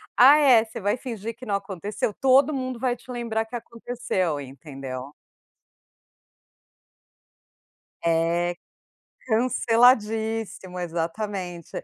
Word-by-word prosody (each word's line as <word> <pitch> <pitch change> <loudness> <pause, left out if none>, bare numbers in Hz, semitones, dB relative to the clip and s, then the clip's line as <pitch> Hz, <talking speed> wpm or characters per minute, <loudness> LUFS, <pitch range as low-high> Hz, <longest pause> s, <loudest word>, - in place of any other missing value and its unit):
“Ah, 275 +5 +8
é? 255 -6 +6
Você 220 - -8
vai 205 +2 +1
fingir 230 -3 -6
que 255 +1 -11
não 205 - 0
aconteceu? 200 +2 -3
Todo 270 +3 +4
mundo 255 -3 -3
vai 245 -1 0
te 250 - -13
lembrar 225 -2 -2
que 225 - -24
aconteceu", 230 -9 -3
entendeu. 135 -1 -8 2.9
É, 170 +1 +1 0.7
canceladíssimo, 225 -4 +2
exatamente. 175 +1 -4
220 Hz, 95 wpm, -25 LUFS, 175-245 Hz, 2.9 s, Ah